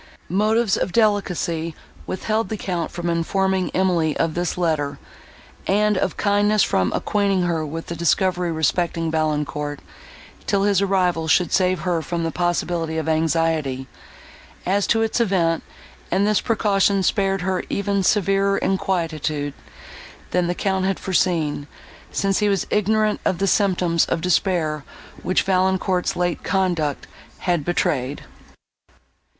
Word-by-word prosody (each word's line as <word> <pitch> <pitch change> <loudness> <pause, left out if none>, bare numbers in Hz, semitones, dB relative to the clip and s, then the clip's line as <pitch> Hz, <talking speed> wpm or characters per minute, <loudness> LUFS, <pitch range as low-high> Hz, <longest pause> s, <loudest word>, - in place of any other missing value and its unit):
Motives 215 +3 +2
of - - -1
delicacy 180 -6 0 0.3
withheld 215 +4 -1
the 220 - -3
Count 175 -5 -3
from 175 0 -5
informing 185 +3 0
Emily 175 -5 +1
of 165 -1 0
this 175 +1 -2
letter, 150 -5 0 0.7
and 210 +2 +3
of - - -1
kindness 205 0 +3
from 95 -1 +1
acquainting 200 -3 +1
her 170 -2 0
with 160 +2 -5
the 170 - -5
discovery 175 +1 +1
respecting 165 +1 0
Valancourt, 150 -2 -1 0.7
till 195 -1 +2
his 200 -2 +3
arrival 180 -4 +1
should 170 +1 +3
save 185 -3 +2
her 175 -2 0
from 170 +1 -3
the 165 - -1
possibility 175 -2 -1
of 160 - -2
anxiety, 160 -4 0 0.8
as 200 +2 +1
to 225 -1 +3
its 225 +2 0
event; 175 -6 +1 0.5
and 195 - +2
this 210 -1 +2
precaution 200 -3 +2
spared 195 -1 +1
her 185 0 -1
even 200 0 0
severer 195 0 +2
inquietude, 160 -6 -1 0.8
than 180 -1 +1
the 175 - -1
Count 190 0 0
had 195 0 0
foreseen, 165 -6 0 0.4
since 195 -1 0
he 210 -1 +2
was 195 -2 0
ignorant 215 +1 +1
of 180 - +1
the 195 - 0
symptoms 180 -4 +2
of - - -1
despair, 170 -4 0 0.4
which 185 +2 +1
Valancourt's 185 -1 +1
late 175 -1 -1
conduct 175 -5 0 0.4
had 175 -4 0
betrayed. 140 -5 -1
180 Hz, 135 wpm, -22 LUFS, 165-195 Hz, 0.8 s, and